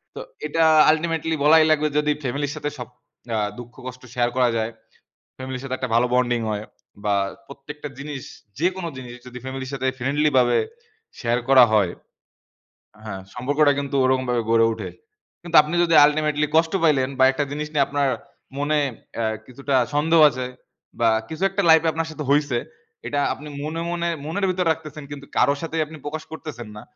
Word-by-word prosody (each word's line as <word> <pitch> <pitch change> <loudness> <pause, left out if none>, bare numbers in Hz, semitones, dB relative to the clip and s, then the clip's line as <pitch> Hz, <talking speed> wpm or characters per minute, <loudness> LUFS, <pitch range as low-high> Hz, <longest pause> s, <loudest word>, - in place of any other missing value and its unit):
তো - - -6 0.3
এটা 165 +2 +1 0.3
আল্টিমেটলি 160 0 -1
বলাই 160 +1 +7
লাগবে 155 0 +3
যদি 150 0 +2
ফ্যামিলির 140 +3 -2
সাথে 150 -1 -3
সব, 125 -2 -6 0.5
আ - - +1 0.2
দুঃখ 120 0 -10
কষ্ট 130 0 -8
শেয়ার 120 -1 +1
করা 125 -1 +4
যায়, 110 +1 -1 0.7
ফ্যামিলির 130 -1 -6
সাথে 130 -1 -3
একটা 130 -2 -4
ভালো 125 +1 +4
বন্ডিং 120 -1 +2
হয় 105 0 -3 0.4
বা 105 - +2 0.3
প্রত্যেকটা 145 +2 -9
জিনিস 140 -2 -6 0.4
যেকোনো 180 0 0
জিনিস 125 -2 -8
যদি 125 0 -9
ফ্যামিলির 130 0 -5
সাথে 130 -1 -2
ফ্রেন্ডলি 145 +4 +1
ভাবে 120 -1 +4 0.6
শেয়ার 120 -1 0
করা 130 -2 +8
হয়, 100 -5 +3 1.1
হ্যাঁ, 95 -3 -6
সম্পর্কটা 145 +4 +2
কিন্তু 140 0 -4
ওরকমভাবে 130 -2 +1
গড়ে 115 0 +5
ওঠে। - - -6 0.5
কিন্তু 170 -1 -4
আপনি 155 +3 -4
যদি 165 -2 +2
আল্টিমেটলি 150 0 +1
কষ্ট 160 +1 +3
পাইলেন 140 -5 +3
বা 130 - +6
একটা 145 +2 -1
জিনিস 150 +1 -3
নিয়ে 140 -2 +3
আপনার 140 -1 0 0.5
মনে, 145 +2 +1 0.4
এ্যা 115 - 0 0.2
কিছুটা 135 +2 -3 0.2
সন্দেহ 160 +3 +3
আছে 130 0 -4 0.5
বা 115 -1 +4 0.2
কিছু 160 +4 -5
একটা 195 +1 -1
লাইফ 160 0 +8
এ - - +3
আপনার 165 0 -2
সাথে 155 -1 -6
হইছে, 145 -4 +2 0.5
এটা 145 - -1
আপনি 150 - -10 0.2
মনে, 160 +2 -3
মনে, 170 0 -1 0.2
মনের 195 +6 -1
ভিতর 180 -1 0
রাখতেছেন 150 -1 -6
কিন্তু 140 -1 -8
কারো 140 - +4
সাথেই 165 -1 -2
আপনি 155 +1 -11
প্রকাশ 155 +1 -4
করতেছেন 150 -7 -8
না। - - -8
145 Hz, 175 wpm, -23 LUFS, 125-155 Hz, 1.1 s, করা